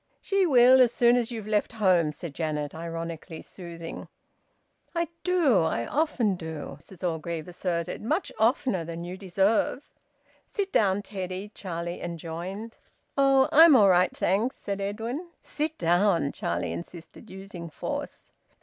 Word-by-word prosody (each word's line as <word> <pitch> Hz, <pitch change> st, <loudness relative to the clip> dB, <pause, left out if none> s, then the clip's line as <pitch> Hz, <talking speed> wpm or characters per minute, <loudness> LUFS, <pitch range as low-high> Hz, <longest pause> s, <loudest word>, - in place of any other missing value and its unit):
"She 390 Hz, -2 st, +1 dB
will, 255 Hz, -2 st, +7 dB
as 245 Hz, -2 st, +5 dB
soon 240 Hz, 0 st, +4 dB
as 240 Hz, -2 st, 0 dB
you've 225 Hz, -4 st, -6 dB
left 215 Hz, +2 st, 0 dB
home," 185 Hz, -8 st, +3 dB
said 150 Hz, +1 st, -8 dB
Janet, 150 Hz, -2 st, -3 dB
ironically 165 Hz, 0 st, -6 dB
soothing. 170 Hz, -2 st, -8 dB, 0.9 s
"I 335 Hz, -1 st, 0 dB
do, 335 Hz, -, +3 dB
I 160 Hz, -8 st, 0 dB
often 265 Hz, -9 st, +1 dB
do!" 160 Hz, -4 st, -6 dB
Mrs 180 Hz, +3 st, -6 dB
Orgreave 165 Hz, 0 st, -4 dB
asserted. 175 Hz, -1 st, -3 dB
"Much 310 Hz, -, -1 dB
oftener 225 Hz, -4 st, +2 dB
than 170 Hz, +1 st, -6 dB
you 175 Hz, +1 st, -6 dB
deserve." 195 Hz, +8 st, 0 dB, 0.6 s
"Sit 400 Hz, -2 st, -3 dB
down, 200 Hz, -, +2 dB
Teddy," 190 Hz, 0 st, -6 dB
Charlie 170 Hz, -2 st, -5 dB
enjoined. 175 Hz, +6 st, -6 dB, 0.4 s
"Oh! 270 Hz, -1 st, +4 dB
I'm 320 Hz, -1 st, +8 dB
all 205 Hz, -5 st, +6 dB
right, 180 Hz, 0 st, +3 dB
thanks," 210 Hz, +8 st, +1 dB
said 200 Hz, 0 st, -4 dB
Edwin. 225 Hz, -, -4 dB, 0.2 s
"Sit 310 Hz, +1 st, -3 dB
down!" 175 Hz, -3 st, +2 dB
Charlie 85 Hz, -1 st, -2 dB
insisted, 165 Hz, -, -10 dB
using 190 Hz, -3 st, -8 dB
force. -, -, -6 dB
190 Hz, 140 wpm, -27 LUFS, 170-240 Hz, 0.9 s, I'm